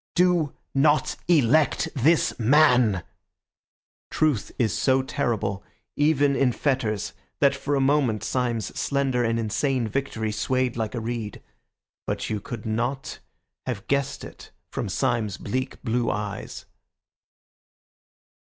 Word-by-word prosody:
Do 175 -4 +2 0.2
not 145 +2 +3
elect 150 -3 +3
this 150 +5 +3
man." 125 - +4 1.1
Truth 150 -9 +1
is 115 -3 +1
so 130 0 +2
terrible, 110 -7 -2 0.3
even 145 -2 +3
in 130 -3 +2
fetters, 115 -6 -1 0.3
that 140 -1 +4
for 140 +1 -2
a - - +2
moment 135 -5 +2
Syme's 120 -4 -1
slender 135 -3 +1
and 115 0 +1
insane 115 +3 0
victory 110 -2 -2
swayed 130 +3 0
like 110 0 -3
a - - -1
reed. 115 -2 -4 0.7
But - - -2
you 105 - -1
could 110 +1 -7
not 120 +5 -2 0.5
have 115 -6 -4
guessed 140 0 -1
it - - -11 0.2
from - - -3
Syme's 115 -3 0
bleak 130 +5 -3
blue 120 0 0
eyes. 105 -2 -4
125 Hz, 120 wpm, -25 LUFS, 110-140 Hz, 1.1 s, man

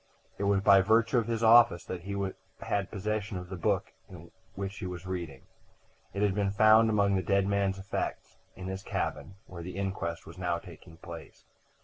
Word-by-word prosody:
It 100 - -1
was 100 -1 +3
by 100 0 +6
virtue 115 +5 +3
of 115 - -3
his 115 -1 -1
office 115 -6 +6
that 90 -1 -5
he 100 +3 -5 0.5
had 100 -2 -1
possession 105 -1 -3
of 90 0 -8
the 95 - -5
book 85 - -1 0.2
in 85 -2 -12 0.2
which 100 0 -5
he - - -4
was 90 0 -7
reading; 85 -7 -5 0.7
it 100 +2 -2
had 100 -2 +2
been 100 0 0
found 110 +3 +5
among 100 -2 +2
the 95 - +1
dead 100 +2 +2
man's 100 -1 0
effects 95 0 -4 0.2
in 95 - -8
his 95 0 -4
cabin, 85 -2 -4
where 85 -2 -9
the 90 +2 -7
inquest 95 -4 -3
was 80 +3 -12
now 90 -2 0
taking 85 -3 -13
place. 85 0 -11
95 Hz, 195 wpm, -29 LUFS, 90-100 Hz, 0.7 s, by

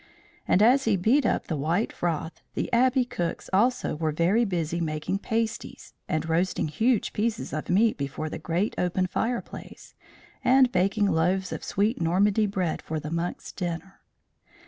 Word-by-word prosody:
And 195 - +4
as 260 +4 +5
he 215 -3 +3
beat 230 +8 +3
up - - 0
the 160 - -2
white 165 +9 0
froth, 165 -1 -3
the - - -3
Abbey 255 +1 +4
cooks 175 -8 -4
also 235 +1 +2
were 155 0 -1
very 180 +10 +2
busy 170 -3 -2
making 155 +4 -2
pasties, 225 +1 -3 0.2
and 165 -2 -1
roasting 165 0 0
huge 220 +9 +1
pieces 225 +2 -2
of 155 - -4
meat 215 0 +3
before 140 +3 -3
the - - -5
great 180 +5 -1
open 180 +1 +1
fireplace, 230 +6 -4 0.5
and 260 0 +5
baking 200 +1 +2
loaves 185 +1 +1
of - - -5
sweet 210 +1 0
Normandy 200 +5 +2
bread 185 -5 -2
for 160 0 -4
the 150 +1 -6
monks' 170 +1 -3
dinner. 180 +1 -5
185 Hz, 160 wpm, -26 LUFS, 165-225 Hz, 0.5 s, as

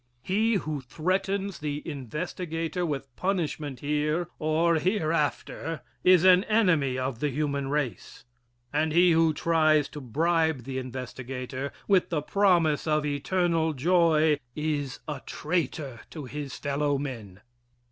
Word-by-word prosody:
He 220 +4 +2
who 155 -6 -2
threatens 190 +7 -1
the 150 0 -4
investigator 165 +4 -3
with 135 -4 -5
punishment 155 -8 -2
here, 150 +3 0
or 160 +2 +2
hereafter, 165 -3 -1 0.2
is 180 -2 +6
an 185 0 +7
enemy 165 - +2
of 130 -2 -2
the 150 - 0
human 140 0 -1
race. 145 -4 -3 0.5
And 155 +1 +1
he 175 +1 +6
who 165 0 +4
tries 155 -2 +3
to 150 - -8
bribe 160 +2 +1
the 130 +1 -4
investigator 130 +1 -5 0.2
with 195 -3 +3
the 150 -4 -1
promise 170 -6 +2
of 150 -1 +2
eternal 160 +2 +1
joy 160 0 +3 0.2
is 150 -3 -2
a 145 -3 -4
traitor 150 -5 -2
to 155 -4 -7
his 145 +1 -6
fellow 145 0 0
men. 115 -9 -6
155 Hz, 125 wpm, -27 LUFS, 140-170 Hz, 0.5 s, an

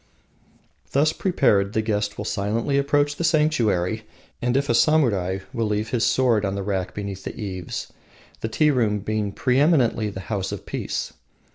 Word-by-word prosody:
Thus 150 +3 +3
prepared 100 - +2
the 110 - +1
guest 105 -1 -1
will 105 - -4
silently 115 +8 0
approach 145 +1 +1
the - - -2
sanctuary, 120 - +2 0.4
and, 125 +1 +1
if 140 0 0
a - - +2
samurai, 110 - +2
will 115 -2 0
leave 105 +1 -1
his 115 0 0
sword 120 -5 +3
on 100 -1 -1
the 100 - -3
rack 95 -2 -2
beneath 100 -2 -5
the - - -7
eaves, 95 -5 -5 0.5
the 110 - -3
tea 150 +6 +3
room 110 -6 +1
being 105 0 -2
preeminently 125 -3 +2
the 95 -1 -7
house 95 -1 -3
of - - -6
peace. - - -4
110 Hz, 165 wpm, -23 LUFS, 100-140 Hz, 0.5 s, Thus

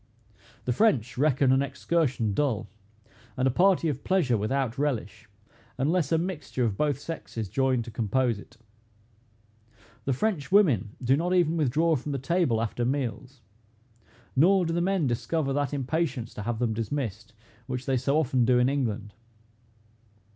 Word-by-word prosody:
The 125 - +1
French 125 - +2
reckon 135 -1 +3
an 135 +1 +4
excursion 135 -5 0
dull, 135 -4 0 0.7
and 130 +1 +2
a - - +3
party 180 +3 +3
of 140 -3 -3
pleasure 175 -11 +2
without 130 +4 -1
relish, 110 -7 -3 0.5
unless 155 +3 +1
a 165 - +4
mixture 165 -7 -3
of 105 -4 -1
both 145 +3 0
sexes 140 -7 -6
join 130 +3 +1
to 115 - -9
compose 115 +1 0
in. - - -12 1.6
The 135 - +1
French 180 - -1
women 140 - +3
do 130 +2 +4
not 175 +5 0
even 170 -2 +3
withdraw 160 +2 +2
from 145 +2 -4
the - - -1
table 135 -5 +1
after 115 +2 -2
meals; 125 -1 -3 0.9
nor 180 +6 +4
do 165 - -1
the 170 - 0
men 190 -3 +1
discover 135 +4 -1
that 145 -1 0
impatience 140 -3 -2
to - - -6
have 115 +2 -2
them 115 -1 0
dismissed, 115 -1 -4 0.3
which 130 -1 -4
they 135 -2 +1
so 135 +4 +1
often 130 -5 +2
do 125 +1 +4
in 125 +1 +3
England. 110 -7 -2
135 Hz, 155 wpm, -27 LUFS, 120-155 Hz, 1.6 s, an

